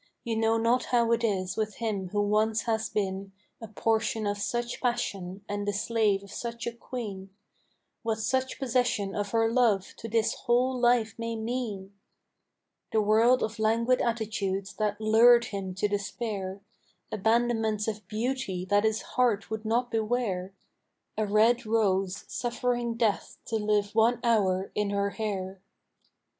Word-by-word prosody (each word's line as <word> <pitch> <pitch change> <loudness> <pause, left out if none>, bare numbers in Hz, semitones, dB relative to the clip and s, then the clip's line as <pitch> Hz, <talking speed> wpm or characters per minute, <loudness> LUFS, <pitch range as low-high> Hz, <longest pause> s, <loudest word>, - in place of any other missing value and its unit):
you 230 -1 -2
know 225 0 +2
not 235 +2 +2
how 235 -2 +2
it 235 0 +2
is 190 -4 0
with 215 -1 -2
him 210 -5 -2
who 205 +2 0
once 215 +2 +1
has 220 -1 -1
been 195 -1 -2 0.3
A 225 - -6
portion 220 0 0
of 205 0 -1
such 240 +3 -2
passion 200 -6 -2
and 205 0 -3
the 205 - +1
slave 210 -2 +1
of 200 - -13
such 235 0 -5
a 235 - -1
queen; 220 -5 -7 0.7
What 225 -2 -1
such 260 +4 -1
possession 245 -6 0
of 205 -1 -2
her 225 +1 +2
love 225 -6 +2
to 225 - -7
his 225 0 +2
whole 255 +1 +1
life 240 -3 +3
may 230 0 -3
mean! 220 -4 -4 1.0
The 220 - +2
world 225 +4 +4
of 220 0 -3
languid 230 +3 +2
attitudes 210 -4 -2
that 210 -1 -1
lured 235 +2 +6
him 195 -2 -5
to 200 +2 +1
despair; 200 -1 -3 0.5
Abandonments 220 0 +1
of 215 -3 -4
beauty 220 -4 -2
that 205 +2 +3
his 220 0 +1
heart 230 -5 0
would 220 0 -4
not 240 +2 0
beware 215 -5 -1 0.6
A 215 -1 0
red 220 +4 +4
rose 200 -3 0
suffering 240 -1 -1
death 225 -3 0
to 225 - -1
live 210 -1 0
one 230 +2 +3
hour 195 -5 +2
in 210 -1 0
her 200 0 0
hair. 195 -4 -4
220 Hz, 150 wpm, -28 LUFS, 205-235 Hz, 1.0 s, lured